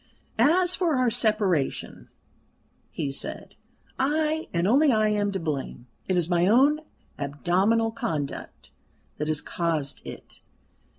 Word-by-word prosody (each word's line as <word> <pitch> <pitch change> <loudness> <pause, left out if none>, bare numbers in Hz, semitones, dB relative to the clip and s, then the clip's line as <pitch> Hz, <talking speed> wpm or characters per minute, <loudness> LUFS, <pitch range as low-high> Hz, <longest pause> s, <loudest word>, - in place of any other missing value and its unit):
"As 355 +4 +4
for 345 -5 +1
our 255 -2 +2
separation," 210 - 0 0.8
he 140 - -3
said, 135 - -3 0.5
"I, 310 +3 0
and 170 +1 0
only 275 +6 +4
I, 215 -2 +3
am 205 -1 0
to 190 - -2
blame. 145 -6 -4 0.2
It 185 - +1
is 170 -2 +2
my 175 0 +2
own 275 +8 +4 0.4
abominable 185 - +1
conduct 155 -10 -5 0.5
that 150 - -3
has 155 -1 0
caused 160 -5 -2
it. - - -10
205 Hz, 125 wpm, -26 LUFS, 160-260 Hz, 0.8 s, As